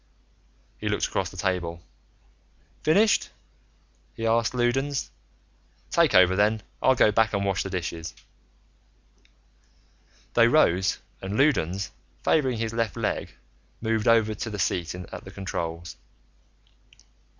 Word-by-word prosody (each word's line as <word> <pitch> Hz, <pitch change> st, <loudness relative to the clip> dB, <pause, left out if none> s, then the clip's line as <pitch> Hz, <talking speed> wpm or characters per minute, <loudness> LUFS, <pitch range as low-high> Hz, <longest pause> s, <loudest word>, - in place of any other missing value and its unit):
He -, -, -2 dB
looked -, -, 0 dB
across -, -, -2 dB
the -, -, -13 dB
table. 85 Hz, -3 st, -2 dB, 1.0 s
"Finished?" 205 Hz, +8 st, +3 dB, 0.9 s
he 115 Hz, -, -4 dB
asked 115 Hz, +1 st, +2 dB
Loudons. 135 Hz, +3 st, 0 dB, 0.8 s
"Take 165 Hz, -10 st, +3 dB
over, 95 Hz, 0 st, +6 dB
then. 105 Hz, +2 st, +2 dB, 0.2 s
I'll 130 Hz, -, +4 dB
go 110 Hz, -, +4 dB
back 110 Hz, +1 st, +2 dB
and 100 Hz, -1 st, 0 dB
wash 95 Hz, -1 st, 0 dB
the 95 Hz, -, -4 dB
dishes." 85 Hz, -3 st, -4 dB, 2.2 s
They 115 Hz, -1 st, +6 dB
rose, 95 Hz, -, +3 dB, 0.2 s
and 95 Hz, +2 st, -4 dB
Loudons, 100 Hz, -, +1 dB, 0.3 s
favoring 130 Hz, -6 st, +2 dB
his 115 Hz, 0 st, -2 dB
left 115 Hz, -5 st, -1 dB
leg, -, -, -2 dB, 0.4 s
moved 110 Hz, -1 st, -1 dB
over 110 Hz, -2 st, +4 dB
to 110 Hz, +2 st, -5 dB
the 105 Hz, -, -5 dB
seat 85 Hz, -2 st, -1 dB
at 90 Hz, -1 st, -8 dB
the -, -, -10 dB
controls. 85 Hz, -3 st, -5 dB
105 Hz, 120 wpm, -26 LUFS, 90-120 Hz, 2.2 s, over